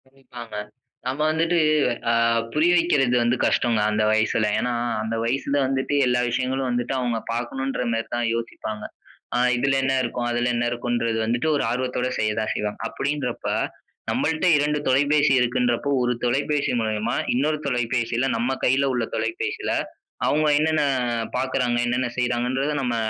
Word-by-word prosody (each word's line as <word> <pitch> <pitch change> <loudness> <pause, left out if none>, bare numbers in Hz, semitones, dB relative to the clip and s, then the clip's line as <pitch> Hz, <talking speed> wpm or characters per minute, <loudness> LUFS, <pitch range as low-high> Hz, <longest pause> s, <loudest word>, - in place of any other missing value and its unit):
கவனிப்பாங்க. 125 -4 -11 0.5
நம்ம 130 +3 -3
வந்துட்டு, 165 +2 +1 0.5
அ - - +2 0.4
புரிய 160 +3 +3
வைக்கறது 145 -8 +2
வந்து 120 +1 +2
கஷ்டங்க, 115 -2 +2
அந்த 110 0 +1
வயசுல. 110 0 +2
ஏன்னா, 125 - -1 0.3
அந்த 110 +1 -2
வயசுல 135 +4 -1
வந்துட்டு, 135 +2 -1
எல்லா 125 0 +2
விஷயங்களு 130 +2 -1
வந்துட்டு, 120 +1 -1
அவங்க 120 -2 -1 0.2
பார்க்கணுன்ற 130 +2 -2
மேரி 115 0 -2
தான் 120 -1 0
யோசிப்பாங்க. 110 -2 -5 0.5
அ - - +2 0.2
இதுல 135 +2 +1
என்ன 135 0 +1
இருக்கும், 120 0 -2
அதுல 120 +1 0
என்ன 120 0 0
இருக்குன்றத 120 -1 -1
வந்துட்டு, 120 +7 0
ஒரு - - 0
ஆர்வத்தோட 125 0 -1
செய்ய 110 0 +1
தான் 110 - -2
செய்வாங்க. 105 0 -3
அப்படின்றப்ப, 140 -4 -3 0.7
நம்மல்ட்ட 160 +2 0
இரண்டு 150 +1 +1
தொலைபேசி 145 +2 +3
இருக்குன்றப்போ, 125 +2 +1
ஒரு 125 0 +1
தொலைபேசி 140 +4 0
மூலியமா, 110 0 -1 0.2
இன்னொரு 150 +5 +1
தொலைபேசியில, 120 0 0
நம்ம 120 +3 0
கையில 135 +2 +3
உள்ள 120 -2 0
தொலைபேசில, 400 +3 -2 0.6
அவங்க 155 +1 +2
என்னென்ன 155 0 +2 0.6
பாக்குறாங்க, 125 -2 0
என்னென்ன 125 +1 0
செய்றாங்கன்றத 125 +3 0
நம்ம 125 -3 -1
125 Hz, 145 wpm, -23 LUFS, 120-140 Hz, 0.7 s, புரிய